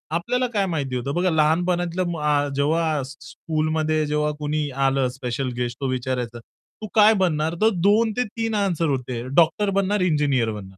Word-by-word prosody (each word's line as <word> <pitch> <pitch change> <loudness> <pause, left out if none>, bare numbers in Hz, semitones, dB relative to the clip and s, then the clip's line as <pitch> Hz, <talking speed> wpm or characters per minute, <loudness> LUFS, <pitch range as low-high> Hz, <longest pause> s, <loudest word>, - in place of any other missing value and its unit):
आपल्याला 250 +9 0
काय 200 -2 +1
माहिती 140 -7 -3
होतं. 130 +3 -3
बघा 180 +1 +2
लहानपणातल्या 175 +3 +1
म 170 -1 -3
अ, 145 -1 +1
जेव्हा 155 +1 +1
स् 135 - -10
स्कूलमध्ये 155 0 -1
जेव्हा 150 0 0
कोणी 150 0 -2 0.2
आलं 135 -1 +2
स्पेशल 130 +1 -3
गेस्ट 120 -1 -3
तो 135 - 0
विचारायचा, 125 -2 -3
"तू 215 - -14
काय 215 0 +7
बनणार?" 160 -1 0
तर 220 - +5 0.2
2-3 225 +1 0
आन्सर 180 -6 0
होते. 125 -3 -3
डॉक्टर 175 +5 +3
बनणार 200 0 0
इंजिनिअर 145 -9 +1
बनणार. 95 -2 -9
155 Hz, 160 wpm, -23 LUFS, 135-180 Hz, 0.2 s, काय